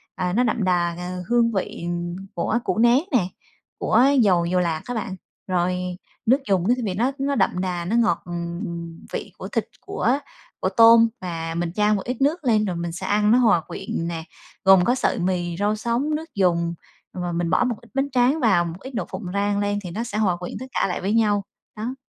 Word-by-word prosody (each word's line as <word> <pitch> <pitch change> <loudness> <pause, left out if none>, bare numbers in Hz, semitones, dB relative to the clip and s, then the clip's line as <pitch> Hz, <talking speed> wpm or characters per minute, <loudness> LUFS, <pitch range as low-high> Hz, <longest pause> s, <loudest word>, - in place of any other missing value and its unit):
à, 180 -1 -1
nó 240 +5 +3
đậm 230 -2 0
đà, 175 -2 +1
à, 180 +1 -5
hương 235 -1 +3
vị 190 -4 -3 0.5
của 220 +6 0
củ - - -1
nén 240 +3 +5
nè, 230 -10 +2 0.5
của 245 - +3 0.2
dầu 180 -6 +3
dầu 180 +2 +1
lạc 165 -3 0
á 245 - -4
bạn. 220 -4 -3 0.3
Rồi 180 -1 +1 0.5
nước 250 +4 +5
dùng 190 -2 +2
nó 240 - +5
thì - - -3
vị 195 - -1
nó 235 +8 +1
nó 280 0 0
đậm 190 -4 +1
đà, 180 -2 -2
nó 205 +6 -1
ngọt, 235 -2 +2
ừm, 170 -1 -5
vị - - -4
của - - -6
thịt, - - -1 0.2
của 285 - 0 0.4
của - - +1
tôm 230 0 +8
và 165 -2 -4
mình 170 -1 -1
chan 210 +1 +3
một 200 - -2
ít 250 +1 -4
nước 310 +5 +1
lên, 220 -4 +3
rồi 185 -3 -2
mình 170 0 -3
sẽ 175 +3 -6
ăn 210 +1 +3
nó 240 - +6
hòa 225 -9 +4
quyện 165 - -4
nè, 165 -1 -4 0.4
gồm 190 -1 +7
có 245 - +3
sợi 260 - 0
mì, 175 -1 -1
rau 205 +1 +1
sống, 240 +7 -1
nước 320 +1 -7
dùng, 170 -3 +2 0.4
và 180 -1 -3
mình 170 0 -1
bỏ - - +3
một 245 -2 0
ít 235 - -18
bánh 275 +1 0
tráng 255 +4 +3
vào, 195 - +3
một 170 +2 -6
ít 265 - -9
đậu 240 - -2
phộng 190 +1 -6
rang 200 0 +1
lên 205 0 0
thì 180 - -6
nó 220 +7 -3
sẽ 235 -3 -4
hòa 190 -5 +2
quyện 180 0 -6
tất 260 - -6
cả - - +1
lại 180 - -3
với 195 +3 0
nhau, 210 -3 +2 0.3
đó. 225 +4 -4
200 Hz, 230 wpm, -23 LUFS, 175-235 Hz, 0.5 s, tôm